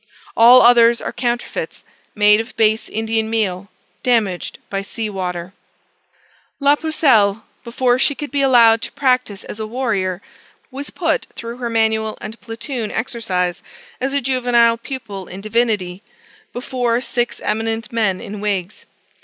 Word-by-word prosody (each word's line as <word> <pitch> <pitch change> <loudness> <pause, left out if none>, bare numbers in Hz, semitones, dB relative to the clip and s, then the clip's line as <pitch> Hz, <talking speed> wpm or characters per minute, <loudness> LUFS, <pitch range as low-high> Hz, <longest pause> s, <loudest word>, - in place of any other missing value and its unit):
All 240 +3 +8
others 235 -1 +6
are - - -5
counterfeits, 240 -1 -3 0.3
made 210 0 +5
of 230 - -12
base 220 0 +2
Indian 220 0 -1
meal, 200 -4 -1 0.3
damaged 220 -8 0
by 195 -1 -3
sea 215 +2 -5
water. 180 -2 -4 1.1
La 285 0 +4
Pucelle, 240 -10 +2 0.2
before 245 +1 +1
she 285 +2 +2
could 295 +1 -6
be 285 0 0
allowed 235 -4 +5
to - - -5
practise 255 -7 0
as 210 - -8
a 220 - -4
warrior, 210 -7 -1 0.5
was 280 +2 -7
put 325 -3 -1
through 235 +1 -7
her 240 -2 -3
manual 220 -1 0
and 220 +2 -8
platoon 230 0 -5
exercise, 195 -7 -2 0.4
as 265 +2 -1
a 280 0 0
juvenile 240 -2 +2
pupil 230 -7 -7
in 185 - -8
divinity, 210 -4 -1 0.5
before 245 -1 -1
six 245 -1 -2
eminent 225 +1 -2
men 210 -5 +1
in 205 0 -7
wigs. 200 -2 -3
225 Hz, 140 wpm, -19 LUFS, 210-245 Hz, 1.1 s, All